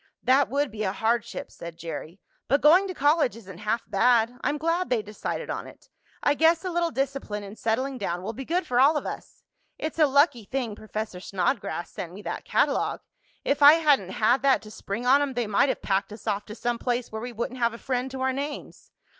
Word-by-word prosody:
"That 270 +2 +4
would 285 0 0
be 215 0 -6
a 190 -2 0
hardship," 225 +1 -1
said 170 -1 -9
Jerry. 165 +2 -7 0.3
"But 280 +3 +2
going 355 +6 +6
to 370 - -4
college 290 -3 +2
isn't 190 -6 -11
half 215 +2 -1
bad. 240 0 +3
I'm 290 - 0
glad 330 +4 0
they 240 -4 +1
decided 210 +1 -5
on - - -5
it. - - -16 0.3
I 290 - +4
guess 325 +4 +3
a 365 - -2
little 340 0 +1
discipline 270 -8 -3
and 200 +1 -9
settling 250 +5 -1
down 180 -3 -3
will 220 +4 -4
be 270 - -6
good 350 +7 -1
for 245 0 +1
all 290 +4 +5
of - - -4
us. - - -8 0.3
It's 315 +1 -4
a 305 - +6
lucky 280 -4 +3
thing 250 -2 -3
Professor 215 -3 -5
Snodgrass 185 0 -2
sent 175 -1 -7
me 205 +2 -10
that - - -5
catalogue. - - +1 0.4
If 280 +1 +1
I 290 +1 +10
hadn't 295 - +3
had 230 +6 +2
that 275 -1 +3
to 215 - -11
spring 215 +3 -5
on 270 +3 +5
'em 280 -3 -2
they 240 -1 0
might 215 +7 +2
have - - -2
packed 195 +1 0
us 215 - -11
off 205 -2 -1
to 215 - -9
some 240 0 -2
place 245 -1 -2
where 220 0 -5
we 245 +1 -5
wouldn't 240 +3 -4
have 235 -1 +1
a - - -8
friend 255 +1 -2
to 265 0 -6
our 260 0 +1
names." 285 +2 -6
245 Hz, 225 wpm, -26 LUFS, 210-280 Hz, 0.4 s, I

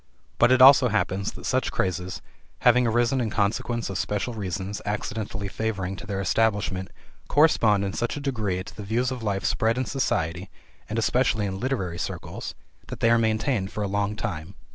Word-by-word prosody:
But 120 +1 +5
it 130 0 +6
also 130 -1 +8
happens 100 -3 0
that - - -10
such - - 0
crazes, 90 0 -2 0.4
having 125 0 +5
arisen 120 +3 +2
in 115 - -1
consequence 110 +3 -1
of 95 -1 -3
special 105 +4 -2
reasons 95 -1 -4
accidentally 105 0 -3
favoring 100 -3 -3
to 100 - -9
their 100 -1 -2
establishment, 100 -2 0 0.4
correspond 110 -10 +4
in 95 - -3
such 120 +4 -2
a - - -3
degree 110 -10 -2
to - - -12
the 105 - -7
views 115 +5 0
of 130 -2 -5
life 100 -3 -2
spread 115 +2 +1
in 130 - 0
society, 90 - -1 0.4
and 110 - -3
especially 115 -1 +2
in 95 -1 -4
literary 95 -9 -2
circles, 80 - -5 0.3
that - - -7
they 115 - +3
are 115 - +5
maintained 110 -2 0
for 105 - -3
a - - -1
long 100 +1 -1
time. 85 -1 -5
105 Hz, 185 wpm, -25 LUFS, 95-120 Hz, 0.4 s, also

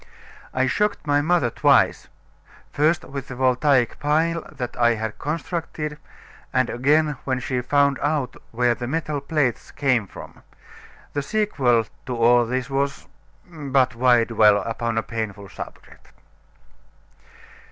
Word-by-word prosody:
I 130 0 +1
shocked 210 +10 0
my 145 -1 +2
mother 155 -6 +1
twice - - +3 0.6
first 155 +3 +2
with 135 -1 -7
the 130 - -7
voltaic 130 0 +2
pile 160 +3 +1
that 130 -5 -6
I 120 -1 +3
had 110 -1 -5
constructed, 150 -1 -4 0.5
and 130 -2 +1
again 150 +3 +2
when 130 -1 -1
she 125 0 -2
found 140 +2 +2
out 145 -3 -1
where 120 +1 +1
the 120 +1 -6
metal 150 0 -2
plates 140 -4 -1
came 125 -7 0
from. - - -12 0.7
The 145 - -1
sequel 135 - +1 0.2
to 125 - -2
all 120 +1 +4
this 125 +1 -2
was 140 +1 -2 0.4
but 140 -6 0
why 120 0 +4
dwell 110 -3 +4
upon 115 0 -3
a 115 - +1
painful 105 -3 -5
subject! - - -11
130 Hz, 130 wpm, -23 LUFS, 120-150 Hz, 0.7 s, all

